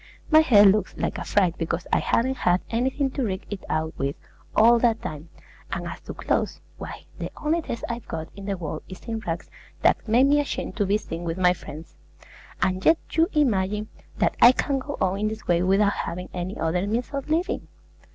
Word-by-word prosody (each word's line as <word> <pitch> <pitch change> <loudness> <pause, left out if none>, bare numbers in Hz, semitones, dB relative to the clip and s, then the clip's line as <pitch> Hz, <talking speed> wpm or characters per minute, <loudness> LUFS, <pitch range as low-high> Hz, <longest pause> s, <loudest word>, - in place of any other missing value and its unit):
My 310 - +8
head 220 -10 +7
looks 205 +2 +3
like - - -2
a - - -4
fright 185 -5 +1
because 165 +1 -2
I - - +5
haven't 260 +3 +1
had 180 +1 +2
anything 260 +4 0
to 270 - -2
rig 190 -3 -3
it 205 - -5
out 160 0 -1
with, 140 +1 -1 0.4
all 235 +2 +6
that 230 -1 +2
time; 155 +2 -6 0.4
and - - -3
as - - -6
to - - -8
clothes, - - -1 0.2
why, - - -8
the - - -3
only 315 +3 0
dress 235 -6 -5
I've 235 0 -5
got 160 -1 -5
in 200 0 -9
the 200 -1 -2
world 160 -3 -5
is 185 - -9
in 225 -1 -3
rags 170 -5 -5 0.3
that - - +3
make 240 +5 +5
me 290 +1 +4
ashamed 290 - -3
to 205 -3 +1
be 205 +2 +3
seen 170 -5 -6
with 165 0 -3
my 180 -1 +4
friends: 160 - -11 0.7
and 185 0 0
yet 320 - +6
you 325 +1 +3
imagine 210 - +1 0.3
that - - +1
I 240 +2 +9
can 275 +1 0
go 285 +2 -6
on 190 +1 +1
in 215 - +1
this 220 0 -5
way 175 -1 +3
without 195 +3 +3
having 180 +1 -4
any 180 +2 -4
other 175 +4 0
means 235 +4 -1
of 275 +1 -4
living! 350 +7 0
205 Hz, 210 wpm, -25 LUFS, 180-250 Hz, 0.7 s, I